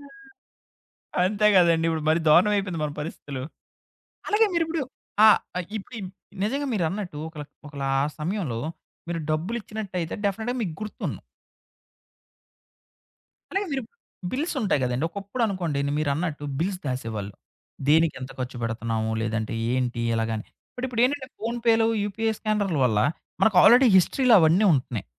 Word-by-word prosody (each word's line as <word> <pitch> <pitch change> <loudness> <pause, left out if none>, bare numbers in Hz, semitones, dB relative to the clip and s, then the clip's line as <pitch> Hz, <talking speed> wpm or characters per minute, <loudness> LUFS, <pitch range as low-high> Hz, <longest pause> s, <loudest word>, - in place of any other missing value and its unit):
ఆ! 405 +8 -16 1.0
అంతే 210 +2 +2
కదండి. 170 -2 +5
ఇప్పుడు 160 -1 -2
మరీ 160 - +3
దారుణం 185 +7 +6
అయిపోయింది 185 -5 -2
మన 150 - -1
పరిస్థితులు. 145 -3 -6 0.9
అలాగే 420 +2 +4
మీరిప్పుడు 330 -1 0 0.4
ఆ! - - +10 0.3
ఆహ్, 180 - -2
ఇప్పుడు 215 +4 -10
ఈమ్ 185 -2 -6 0.3
నిజంగా 275 +7 -1
మీరన్నట్టు 180 -2 -2
ఒకళ 155 -2 -8 0.2
ఒకలా 140 -2 -4 0.3
సమయంలో 155 - -2 0.5
మీరు 170 -1 -2
డబ్బులిచ్చినట్టయితే 190 0 -3
డెఫనెట్‌గా 220 +5 -1
మీకు 175 -7 -2
గుర్తున్ను 215 -1 -4 2.3
అలాగే 395 +1 0
మీరు 270 - -1 0.5
బిల్స్ 305 +7 -1
ఉంటాయి 195 -9 +1
గదండి. 125 +4 -1
ఒకప్పుడనుకోండి 195 - -2 0.2
మీరన్నట్టు 150 +1 -1
బిల్స్ 185 +3 -1
దాసేవాళ్ళు. 110 -6 -4 0.6
దేనికెంత 150 -4 +2
ఖర్చుపెడుతున్నాము? 115 -3 -2
లేదంటే 110 0 -2 0.2
ఏంటి 125 -2 -1
ఎలాగాని? 110 -1 -2 0.3
బట్ 250 - -4
ఇప్పుడేంటంటే 255 +3 +1
ఫోనుపేలు 230 0 +2 0.2
యూపీఎ 220 +2 -1
స్కానర్ల 205 -7 0
వల్ల 110 -4 +2 0.4
మనకి 215 -4 +4
ఆల్‌రడీ 245 +3 +8
హిస్టరీలో 245 +6 +4
అవన్నీ 165 +6 +4
ఉంటున్నాయి. 125 -6 -1
180 Hz, 120 wpm, -25 LUFS, 140-225 Hz, 2.3 s, ఆ